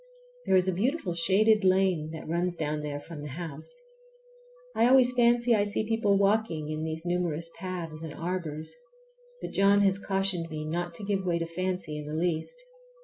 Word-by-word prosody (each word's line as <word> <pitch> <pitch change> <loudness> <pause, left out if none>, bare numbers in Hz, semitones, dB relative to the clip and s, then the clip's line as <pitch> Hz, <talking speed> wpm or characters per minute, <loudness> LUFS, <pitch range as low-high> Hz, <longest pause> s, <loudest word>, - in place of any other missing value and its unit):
There - - +4
is 185 0 +4
a 185 - +2
beautiful 215 - 0
shaded 205 +5 +3
lane 185 -4 +2
that 160 - -8
runs 175 +2 0
down 150 -2 -2
there 145 -1 -4
from 155 0 -9
the 150 - -6
house. 170 - -5 0.9
I 230 - +4
always 250 -1 +5
fancy 240 0 +4
I 210 -2 +3
see 205 +1 -1
people 225 -3 +2
walking 195 -7 +1
in 155 0 -3
these 160 +1 -4
numerous 170 -2 -1
paths 170 -4 -5
and 160 -2 -6
arbors, 165 -2 -4 0.7
but - - -4
John 200 +1 +4
has 195 -1 +3
cautioned 195 -4 -1
me 155 -1 -5
not 170 +2 -3
to 205 - -7
give 195 -1 0
way 175 -2 +1
to 165 - -2
fancy 180 -2 -3
in 150 - -7
the 150 - -4
least. 180 - -2
180 Hz, 185 wpm, -28 LUFS, 160-200 Hz, 0.9 s, always